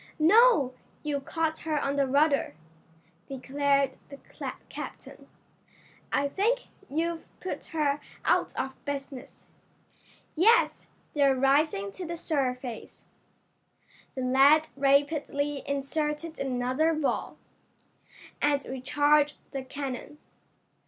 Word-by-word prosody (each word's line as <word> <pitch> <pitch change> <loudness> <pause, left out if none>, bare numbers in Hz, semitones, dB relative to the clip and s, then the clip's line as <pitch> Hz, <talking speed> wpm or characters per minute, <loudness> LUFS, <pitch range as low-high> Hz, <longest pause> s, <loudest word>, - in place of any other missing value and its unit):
"No, 330 - +5 0.3
you 295 -2 -1
caught 320 +3 -2
her 310 -1 -1
on 280 0 -1
the 280 -1 +2
rudder," 280 - +2 0.7
declared 275 0 0
the 280 - -9 0.5
captain. - - -9 0.8
"I 280 - +2
think 450 - 0 0.2
you've 330 +3 -1 0.2
put 370 - -5
her 295 -3 0 0.3
out - - +1
of 265 0 -5
business. 275 -1 -6 0.9
Yes, 440 +9 +4 0.3
they're 280 -2 +4
rising 270 -6 +2
to 365 - -7
the 340 +1 -4
surface." 255 -7 -3 1.1
The 260 - -3
lad 275 +5 +5
rapidly 285 +1 +1
inserted 300 +3 -2
another 265 +5 +1
ball, 305 -2 -2 1.0
and 285 -1 +2
recharged 290 +3 +2
the 270 -2 -4
cannon. 275 +2 -6
285 Hz, 100 wpm, -28 LUFS, 270-310 Hz, 1.1 s, No